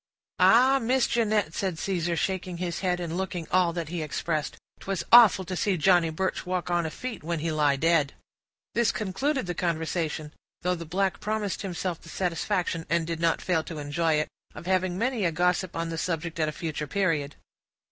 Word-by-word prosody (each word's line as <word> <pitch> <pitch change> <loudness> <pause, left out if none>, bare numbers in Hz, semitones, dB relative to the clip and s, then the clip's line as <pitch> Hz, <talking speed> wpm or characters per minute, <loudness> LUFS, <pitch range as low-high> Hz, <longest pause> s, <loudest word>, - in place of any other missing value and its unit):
"Ah! 260 +4 +6
Miss 255 +1 +2
Jinnett," 215 -8 +1
said 185 -3 -2
Caesar, 175 -2 -1
shaking 185 0 -2
his 175 -2 -3
head, 180 -2 0
and 170 -1 -4
looking 180 -3 -3
all 180 -2 +4
that 165 -2 -4
he 170 -1 -3
expressed, 155 0 -2 0.2
"'twas 195 -2 -3
awful 225 -5 +8
to 185 +1 -4
see 190 +1 +1
Johnny 175 0 +4
Birch 185 +4 -2
walk 180 -1 -2
on 170 -2 +1
a - - -3
feet 250 +8 -6
when 170 +1 -2
he 160 +1 -2
lie 150 -2 +3
dead!" 155 -1 +2 0.6
This 235 -1 +3
concluded 255 +7 -1
the 175 - -2
conversation; 160 -2 -2 0.3
though 180 +1 +2
the 170 -1 -5
black 190 +3 0
promised 210 -2 -2
himself 180 -2 -3
the 170 - -13
satisfaction, 175 -1 -1
and 165 +1 +1
did 165 0 -3
not 165 -1 +1
fail 170 -4 +1
to 165 - -7
enjoy 155 +3 0
it, 155 0 +1 0.3
of - - -9
having 185 -1 +1
many 235 0 0
a 170 - +2
gossip 180 +2 0
on 165 0 -2
the 165 -1 -3
subject 165 -1 -3
at 155 -1 +2
a - - -3
future 150 -1 -4
period. 160 -8 0
175 Hz, 195 wpm, -27 LUFS, 165-190 Hz, 0.6 s, awful